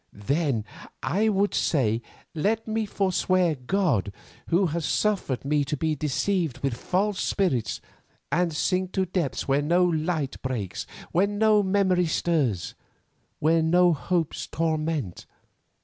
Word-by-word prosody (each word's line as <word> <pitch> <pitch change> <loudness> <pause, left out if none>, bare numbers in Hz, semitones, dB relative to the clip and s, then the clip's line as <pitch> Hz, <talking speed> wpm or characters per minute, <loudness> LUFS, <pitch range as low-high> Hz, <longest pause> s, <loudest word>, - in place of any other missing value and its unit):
"Then 135 +1 -1 0.4
I 215 +5 +2
would 200 0 +1
say, 115 -7 +1 0.3
let 220 +8 0
me 220 0 -1
forswear 185 -3 +1
God 135 - 0 0.4
Who 175 +3 +3
has 170 0 -2
suffered 170 - 0
me 145 0 +2
to 145 +2 -2
be 160 +2 0
deceived 155 +1 -1
with 135 -3 +1
false 190 - -1
spirits, 130 - 0 0.5
and 170 +3 +2
sink 185 +4 0
to 190 - +1
depths 175 -6 -2
where 140 +1 +2
no 175 +5 +3
light 160 -4 -1
breaks, 120 -8 -4 0.2
where 185 +4 +3
no 210 +1 +3
memories 190 -4 +2
stir, 150 - +1 0.8
where 165 +2 +3
no 175 +2 +4
hopes 165 +1 -2
torment. 155 - -2
165 Hz, 130 wpm, -26 LUFS, 145-190 Hz, 0.8 s, no